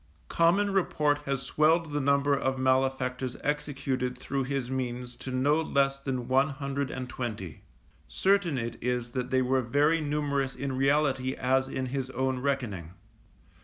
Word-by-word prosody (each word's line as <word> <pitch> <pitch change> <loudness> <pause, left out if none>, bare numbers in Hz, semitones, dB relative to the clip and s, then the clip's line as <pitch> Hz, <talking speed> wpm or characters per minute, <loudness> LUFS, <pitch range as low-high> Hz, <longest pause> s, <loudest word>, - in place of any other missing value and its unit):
Common 195 +5 +3
report 150 -6 +2
has 135 -1 -1
swelled 155 +3 +2
the 145 - 0
number 140 +1 +3
of 135 -1 -1
malefactors 130 -1 0
executed 135 -3 -2
through 135 +1 -2
his 135 -2 -2
means 125 -1 -4
to - - -7
no 140 +5 +2
less 140 -3 +1
than 130 -3 -3
one 135 +3 +3
hundred 140 0 -3
and 130 -1 -5
twenty; 110 -10 -5 0.5
certain 180 - +2
it 115 -1 -3
is 125 -1 -1
that 125 0 -3
they 130 0 +2
were 130 +1 +2
very 145 +7 +2
numerous 145 -2 -1
in 140 -1 -3
reality 135 -1 +2
as 130 +1 +1
in 130 -1 -3
his 130 0 -3
own 130 0 -1
reckoning. 115 - -2
135 Hz, 155 wpm, -28 LUFS, 125-145 Hz, 0.5 s, Common